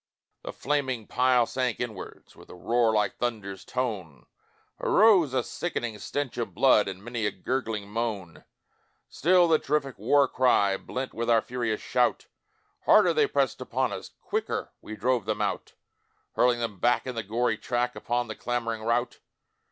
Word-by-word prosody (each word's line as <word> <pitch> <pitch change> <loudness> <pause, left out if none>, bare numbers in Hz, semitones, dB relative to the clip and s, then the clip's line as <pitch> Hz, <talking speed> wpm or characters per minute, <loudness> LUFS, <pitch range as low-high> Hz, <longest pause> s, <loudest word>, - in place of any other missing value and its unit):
The - - -6
flaming 130 -5 -2
pile 125 0 +3
sank 125 -1 -2
inwards 110 -6 -7
With - - -16
a - - -10
roar 115 +5 +2
like 105 -2 0
thunder's 105 -5 -4
tone; 100 - -4 0.5
Arose 195 - +4
a 130 -2 0
sickening 120 -11 -4
stench 140 0 -4
of 115 - -4
blood 125 -7 +4
And 95 0 -6
many 120 -2 -2
a - - -1
gurgling 110 -1 -3
moan; 105 -5 -4 0.7
Still 180 +2 +4
the 160 -1 +4
terrific 140 -5 -2
war 135 +6 +4
cry 115 -7 +3
Blent 130 +6 -5
with 115 +1 -3
our 115 -2 +4
furious 120 -3 -2
shout, 125 -1 +1 0.6
Harder - - +6
they 445 -2 +3
pressed - - 0
upon - - -1
us - - -7
Quicker 435 0 -3
we 110 - -8
drove 120 -1 0
them 110 -1 -2
out - - -2 0.6
Hurling 125 -1 +3
them 115 -5 -4
back 120 +4 +2
in 130 - -4
the 115 - -3
gory 110 +2 -1
track, 125 0 -1
Upon 120 0 -2
the 110 - -5
clamouring 115 -2 -3
rout. 115 +2 -1
120 Hz, 160 wpm, -27 LUFS, 110-130 Hz, 0.7 s, Harder